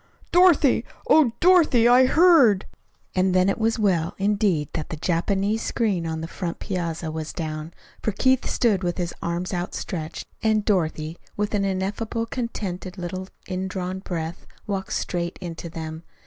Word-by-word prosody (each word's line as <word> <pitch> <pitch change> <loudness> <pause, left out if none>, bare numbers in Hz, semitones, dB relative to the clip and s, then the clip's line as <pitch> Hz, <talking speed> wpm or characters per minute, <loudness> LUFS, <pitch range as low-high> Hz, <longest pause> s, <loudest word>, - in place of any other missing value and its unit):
"Dorothy, 345 -6 +5 0.2
oh, 300 -7 +5
Dorothy 330 -10 +5
I 250 +1 +6
heard!" 290 - +5 0.5
And 185 0 +2
then 185 +1 +4
it 195 - -1
was 225 0 +1
well, 180 -6 +1
indeed, 200 -6 +1
that 155 -3 -4
the - - -4
Japanese 195 +6 0
screen 195 -10 0
on 160 0 -3
the 165 - -4
front 170 0 -4
piazza 170 -3 -3
was 155 0 -4
down, 155 -1 -5 0.3
for 215 - 0
Keith 260 +5 +2
stood 215 -6 +2
with 175 -1 -1
his 175 -1 -2
arms 175 +2 -2
outstretched, 175 -2 -4 0.2
and 215 -2 +2
Dorothy, 160 -4 0 0.2
with 210 +1 -1
an 200 -1 +1
ineffably 200 +4 -2
contented 195 -7 -4
little 185 +1 -5 0.2
indrawn 185 0 -3
breath, 170 -3 -5 0.2
walked 195 -2 -3
straight 170 -1 -2
into 170 -1 -6
them. 160 0 -6
190 Hz, 150 wpm, -24 LUFS, 170-220 Hz, 0.5 s, I